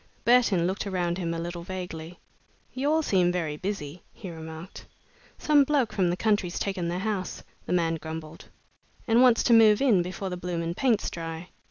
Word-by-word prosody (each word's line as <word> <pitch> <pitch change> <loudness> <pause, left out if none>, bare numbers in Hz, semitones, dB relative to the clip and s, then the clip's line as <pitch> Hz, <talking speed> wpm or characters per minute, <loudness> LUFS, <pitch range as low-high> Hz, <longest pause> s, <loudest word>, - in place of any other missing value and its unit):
Burton 230 -8 +4
looked 190 +3 -2
around 180 -2 -1
him 170 -2 -2
a 165 - -3
little 170 +1 -5
vaguely. 175 -2 -7 0.6
"You 270 +3 -1
all 320 +1 +2
seem 180 -8 +2
very 165 -4 -2
busy," 175 -3 -5
he 185 - -9
remarked. 160 +2 -9 0.5
"Some 295 -2 +4
bloke 275 -5 +1
from 185 -3 +1
the 175 - -1
country's 205 -3 0
taken 190 -4 -2
the 170 - -2
'ouse," 195 -4 -3 0.2
the - - -1
man 165 -2 +1
grumbled, 160 0 -8 0.6
"and 230 +2 +4
wants 250 -3 +5
to 240 - +4
move 220 -2 +6
in 235 -10 +4
before 185 +2 -5
the 180 - -4
blooming 170 -1 -3
paint's 235 +2 +1
dry. 165 +1 -6
180 Hz, 180 wpm, -27 LUFS, 170-210 Hz, 0.6 s, move